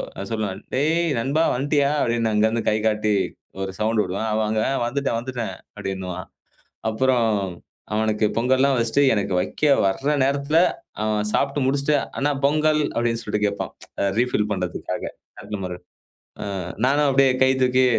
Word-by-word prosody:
நான் 100 - -6
சொல்லுவேன், 105 -4 -2 0.2
"டேய் 155 +5 +2 0.2
நண்பா! 140 +7 +1
வந்துட்டீயா?" 145 +2 +1
அப்டின்னு 115 -1 +1
அங்கருந்து 110 +2 +2
கை 105 - +2
காட்டி 105 -1 +1 0.5
ஒரு 95 0 -3
சவுண்டு 110 0 +2
வுடுவேன். 100 +5 -3
அவா 110 0 +1
அவங்க 110 0 0 0.2
"வந்துட்டேன், 135 -1 -1
வந்துட்டேன்" 120 -5 -4 0.2
அப்டின்னுவான். 95 -2 -5 0.6
அப்புறம் 120 0 +2 0.7
அவனுக்கு 110 0 +1
பொங்கல்லாம் 130 +3 +3
வெச்சுட்டு, 115 +4 +2
எனக்கு 100 -2 -1
வெக்க 150 - -1 0.2
வர 140 +10 +1
நேரத்துல 140 +3 +1 0.4
அவன் 105 -1 0
சாப்ட்டு 140 0 +1
முடிச்சுட்டு, 140 +2 +2 0.2
"அண்ணா 145 +1 +1
பொங்கல்", 155 +1 +2
அப்டின்னு 115 -1 0
சொல்லிட்டு 105 -1 -1
கேப்பான். 100 0 -3 0.5
ரீஃபில் 120 -4 +1
பண்றதுக்காக 90 -3 -3 0.4
அடுத்த 105 - -5
முற. 90 -1 -4 0.7
ஆ - - -5 0.4
நானும் 145 +2 +3
அப்டியே 135 0 +4
கை 130 - +5
தூக்கி, 130 0 +4
115 Hz, 140 wpm, -23 LUFS, 105-140 Hz, 0.7 s, கை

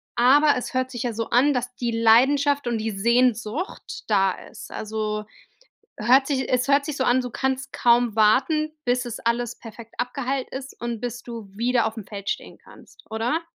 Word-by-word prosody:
aber 285 +5 +5
es 250 - -5
hört 255 0 -1
sich 240 -1 -4
ja 240 -2 -2
so 225 +1 -4
an, 275 +4 +4
dass 250 0 -3
die 240 -1 -2
Leidenschaft 265 +5 +4
und 235 -1 0
die 220 0 -2
Sehnsucht 235 - 0
da 195 -3 +3
ist. - - -11
Also, 215 0 -3 0.7
hört 255 +5 +4
sich 265 -3 -1
es 250 +1 +1
hört 280 0 +3
sich 300 -2 -4
so 260 - +1
an, 255 +1 +3
du 250 - -5
kannst 265 +1 -2
kaum 235 -2 +3
warten, 305 +9 +3
bis 250 +1 +1
es 240 - -5
alles 235 +1 -1
perfekt 230 0 -11
abgeheilt 260 +1 -2
ist 265 0 -7
und 235 -2 -3
bis 245 0 -4
du 230 -4 -8
wieder 235 0 +1
auf'm 220 -2 -7
Feld 200 -2 -6
stehen - - -4
kannst, - - -18
oder? 240 +9 -1
245 Hz, 185 wpm, -24 LUFS, 225-265 Hz, 0.7 s, aber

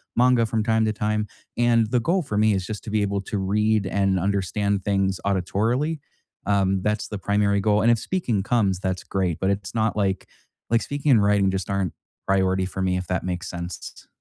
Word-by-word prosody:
manga 125 -1 +4
from 110 0 -1
time 110 0 +2
to 110 - +1
time, 105 0 -1 0.3
and 120 -1 +3
the 125 - +3
goal 175 +9 +1
for 135 -7 -4
me 105 +1 +3
is 95 -1 -2
just 105 +1 -6
to - - -5
be 105 -1 +1
able 100 0 -1
to 105 - -3
read 105 +2 +1
and 95 0 +1
understand 100 +1 0
things 95 -2 +1
auditorily, 110 - 0 0.5
um, 95 -1 +2
that's 105 +2 -1
the 105 - -5
primary 100 0 +1
goal, 105 +1 +2
and 120 - +5
if 115 - +2
speaking 125 - -1
comes, 100 -4 +1
that's 95 -1 -2
great, 90 -4 -1
but 95 +1 +1
it's 100 +1 -4
not, 110 -1 +1
like 95 -2 -1 0.4
like, 115 0 +4
speaking 145 0 -1
and 115 -5 +6
writing 100 -1 +3
just 95 0 -3
aren't 100 -2 -1 0.3
priority 95 -1 +2
for 95 +1 -5
me 90 -1 +1
if 90 - -4
that 90 -2 -1
makes 90 0 -3
sense. 85 -1 -7
100 Hz, 205 wpm, -24 LUFS, 95-110 Hz, 0.5 s, and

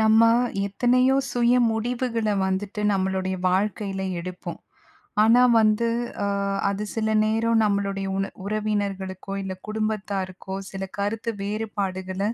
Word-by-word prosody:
நம்ம 220 0 +5 0.5
எத்தனையோ 250 +6 +3 0.2
சுய 240 0 +3 0.2
முடிவுகள 230 0 -1 0.2
வந்துட்டு 200 +3 -2
நம்மளுடைய 190 -1 0
வாழ்க்கையில 195 0 -1 0.2
எடுப்போம். 180 +1 -7 0.6
ஆனா 230 +3 +6 0.2
வந்து, 215 +2 +3 0.4
அ - - +1 0.4
அது 200 +1 -3
சில 220 -1 0 0.2
நேரம் 225 +1 +2
நம்மளுடைய 200 -1 0
உன 195 0 -1
உறவினர்களுக்கோ! 200 -2 -2
இல்ல, 190 -1 -4
குடும்பத்தாருக்கோ! 200 -3 -3 0.2
சில 195 0 -4
கருத்து 220 +3 -1
வேறுபாடுகள 195 -3 -3
205 Hz, 105 wpm, -24 LUFS, 195-220 Hz, 0.6 s, ஆனா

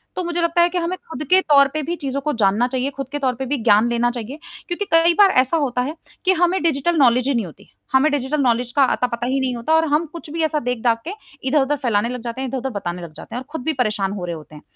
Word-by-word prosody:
तो 365 - -2
मुझे 345 0 -2
लगता 335 +1 +2
है 345 - +4
कि 360 - -3
हमें 350 +1 -1
खुद 305 - -5
के 375 +1 +6
तौर 280 -5 +5
पे 310 - -1
भी 340 +5 -2
चीज़ 275 -4 -4
को 300 +2 -2
जानना 205 +5 +3
चाहिए, 260 +1 -2
खुद 275 -2 -6
के 290 - -3
तौर 260 -3 0
पे 265 +2 -4
भी 285 +3 -1
ज्ञान 220 +1 +4
लेना 240 0 +1
चाहिए 245 +5 -7 0.3
क्योंकि 370 +3 -3
कई 330 +1 +5
बार 395 -2 +7
ऐसा 260 +6 0
होता 255 -5 0
है 295 +6 -3 0.3
कि 375 - +5
हमें 360 +1 +2
डिजिटल 330 +1 +1
नौलेज 250 -2 +4
ही 280 - +2
नहीं 230 -6 0
होती। 165 - -14 0.2
हमें 275 +4 +4
डिजिटल 290 +1 -1
नौलेज 245 -1 +1
का 280 - +5
अता 250 - 0
पता 235 -1 -4
ही 265 +2 0
नहीं 260 -2 -1
होता 235 +7 -1
और 320 0 +3
हम 315 +3 +2
कुछ 335 -3 -9
भी 325 0 -1
ऐसा 310 -1 +1
देख-दाख 235 -2 0
के - - -3 0.4
इधर-उधर 285 +1 +2
फैलाने 235 -3 0
लग 250 -1 -5
जाते 235 +2 -5
हैं, 265 - -2
इधर-उधर 265 +1 -3
बताने 180 -6 -5
लग 170 -2 -9
जाते 160 +8 -10
हैं - - -2
और 260 - -12
खुद 320 - -5
भी 315 +3 0
परेशान 210 -6 -1
हो 190 -4 -5
रहे 170 -1 -4
होते 155 -1 -12
हैं। 150 - -12
265 Hz, 285 wpm, -20 LUFS, 235-315 Hz, 0.4 s, बार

